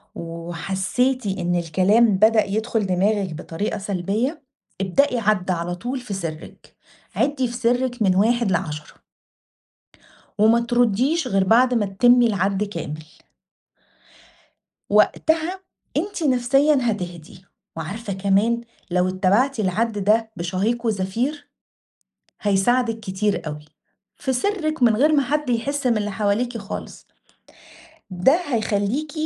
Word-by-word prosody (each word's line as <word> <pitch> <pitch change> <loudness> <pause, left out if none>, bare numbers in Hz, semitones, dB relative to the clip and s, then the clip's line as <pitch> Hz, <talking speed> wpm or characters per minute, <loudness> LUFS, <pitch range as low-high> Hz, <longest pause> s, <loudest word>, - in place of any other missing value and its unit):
وحسيتِ 190 - -2
إن 175 -2 -1
الكلام 190 +5 +3
بدأ 220 +1 +4
يدخل 215 0 -1
دماغِك 190 -1 0
بطريقة 170 +6 -4
سلبية، 205 - -2 0.4
ابدئي 245 +6 +2
عد 200 -4 +1
على 175 0 -2
طول 245 +8 -4
في 245 -5 -7
سرِّك. 165 -4 -7 0.4
عِدّي 275 -3 +1
في 235 - -7
سرِّك 245 0 0
من 190 -3 +3
1 225 +2 +2
ل10. 150 -3 -4 1.3
وما 220 +3 +5
ترُديش 245 +6 +1
غير 195 -4 +2
بعد 245 +5 +4
ما 220 -4 +1
تتمي 240 +5 +4
العَد 195 -1 0
كامل. 165 -6 -6 1.9
وقتها 330 +4 +2 0.4
أنتِ 360 0 -2
نفسيًا 275 +3 +3
هتهدي، 180 -5 -4 0.3
وعارفة 200 +7 -5
كمان 200 +5 +1 0.3
لو 180 +1 +2
اتبعتِ 205 +8 +1
العَد 210 +2 -1
ده 220 +2 +2
بشهيق 195 +8 -1
وزفير، 235 +9 -2 0.9
هيساعدِك 225 +3 +1
كتير 205 -2 -2
أوي. 150 0 -6 0.5
في 265 -2 -2
سرِّك 310 0 -1
من 225 -3 +5
غير 300 +5 +3
ما 285 -2 +4
حد 295 +1 -1
يحس 270 +4 -1
من 235 -3 +3
اللي 210 0 -1
حواليكِ 220 +4 -1
خالص. 200 0 -8 1.1
ده 185 +10 +3
هيخلّيكِ 230 +3 -1
215 Hz, 115 wpm, -22 LUFS, 190-250 Hz, 1.9 s, وما